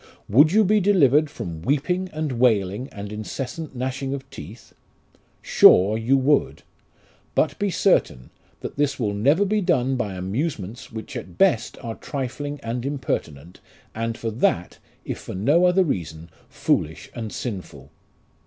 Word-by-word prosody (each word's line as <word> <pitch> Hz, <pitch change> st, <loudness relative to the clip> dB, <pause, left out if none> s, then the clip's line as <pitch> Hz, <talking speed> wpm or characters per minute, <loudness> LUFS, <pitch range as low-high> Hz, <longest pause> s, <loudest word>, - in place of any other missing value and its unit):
Would 145 Hz, +9 st, +5 dB
you 215 Hz, +3 st, +5 dB
be 210 Hz, +2 st, +3 dB
delivered 155 Hz, -7 st, +4 dB
from 85 Hz, -, -7 dB
weeping 165 Hz, -, 0 dB
and 155 Hz, -2 st, -3 dB
wailing, 110 Hz, 0 st, +2 dB
and 100 Hz, 0 st, -7 dB
incessant 135 Hz, -, -6 dB
gnashing 130 Hz, +2 st, -3 dB
of 135 Hz, -, -9 dB
teeth? 100 Hz, +10 st, -11 dB, 0.7 s
Sure 100 Hz, +4 st, +6 dB
you 115 Hz, +5 st, +2 dB
would! 140 Hz, +2 st, +1 dB, 0.7 s
But -, -, +1 dB
be 205 Hz, -, +1 dB
certain, 60 Hz, -, +1 dB, 0.3 s
that -, -, -7 dB
this 145 Hz, -1 st, 0 dB
will 105 Hz, -4 st, 0 dB
never 140 Hz, -, +3 dB
be 210 Hz, +2 st, +1 dB
done 135 Hz, -8 st, +1 dB
by 105 Hz, -6 st, -3 dB
amusements 105 Hz, -, -4 dB
which 110 Hz, -1 st, -8 dB
at -, -, -8 dB
best 180 Hz, -, +2 dB
are 115 Hz, -, -4 dB
trifling 145 Hz, +3 st, -5 dB
and 115 Hz, +1 st, -3 dB
impertinent, 90 Hz, -, -4 dB, 0.3 s
and 115 Hz, 0 st, -3 dB
for 115 Hz, -, -3 dB
that, 90 Hz, -6 st, 0 dB, 0.3 s
if -, -, -4 dB
for -, -, -8 dB
no 145 Hz, -, +3 dB
other 180 Hz, +1 st, +4 dB
reason, 85 Hz, -, -4 dB, 0.2 s
foolish 80 Hz, +2 st, -1 dB
and 115 Hz, -3 st, -5 dB
sinful. 90 Hz, -, -7 dB
125 Hz, 145 wpm, -23 LUFS, 105-150 Hz, 0.7 s, Sure